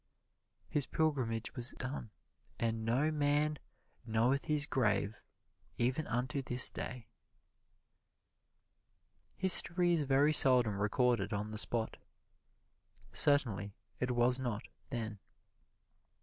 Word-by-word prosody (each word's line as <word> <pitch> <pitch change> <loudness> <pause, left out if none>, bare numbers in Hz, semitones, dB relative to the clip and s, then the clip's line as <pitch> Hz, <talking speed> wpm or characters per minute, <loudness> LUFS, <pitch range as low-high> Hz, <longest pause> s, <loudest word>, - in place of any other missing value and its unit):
His 145 -3 -1
pilgrimage 130 -8 -1
was 120 -1 0
done. 130 -3 -6 0.5
"And 115 -1 -2
no 130 +8 +1
man 150 0 0 0.4
knoweth 120 +4 0
his 150 -1 +2
grave 105 -7 0 0.6
even 130 +6 -1
unto 130 +4 -2
this 125 -1 +2
day." 125 -2 -6 2.3
History 180 -1 +1
is 165 - +1
very 140 +2 +2
seldom 125 -8 +6
recorded 115 0 0
on 105 +1 -4
the 110 - -2
spot 115 -1 -1 1.2
certainly 105 -9 +2 0.2
it 125 - -2
was 125 +1 +2
not 120 -5 -3 0.3
then. 110 -5 -5
125 Hz, 100 wpm, -33 LUFS, 115-145 Hz, 2.3 s, seldom